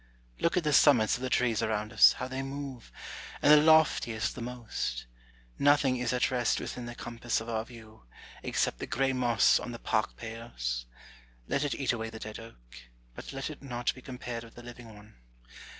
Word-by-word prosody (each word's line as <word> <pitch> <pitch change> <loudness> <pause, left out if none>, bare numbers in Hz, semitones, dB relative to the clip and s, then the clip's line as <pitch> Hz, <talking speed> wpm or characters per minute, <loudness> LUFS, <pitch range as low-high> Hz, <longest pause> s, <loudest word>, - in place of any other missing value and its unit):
Look 170 - +1
at 180 - +2
the 150 -1 +1
summits 120 -9 +5
of 125 - -7
the 130 - -2
trees 120 -3 +1
around 110 -1 -2
us, - - +8
how 125 - -5
they 130 +1 -4
move, 135 -2 -7 0.5
and 150 - +5
the 150 - +10
loftiest 150 -8 +3
the 125 - -8
most: 115 - -4 0.5
nothing 140 -2 +4
is 125 - -1
at 125 +1 +1
rest 120 -3 +1
within 120 -1 -6
the 120 - -7
compass 120 0 -3
of 110 - -8
our 110 -1 -1
view, 110 - -14 0.4
except - - -1
the - - -5
grey 135 +5 0
moss 120 -2 +3
on 120 - -6
the - - -6
park 110 -1 -1
pales. 60 - -5 0.6
Let 140 - 0
it 145 - -1
eat 135 - 0
away 115 -1 -4
the 110 - -9
dead 110 0 -7
oak, 115 - -12 0.5
but - - -9
let 135 +3 -4
it 150 - -11
not 120 -3 -2
be 130 - -13
compared 125 -3 -6
with 115 - -15
the 120 - -11
living 120 -1 -11
one. 105 - -16
120 Hz, 200 wpm, -30 LUFS, 110-130 Hz, 0.6 s, the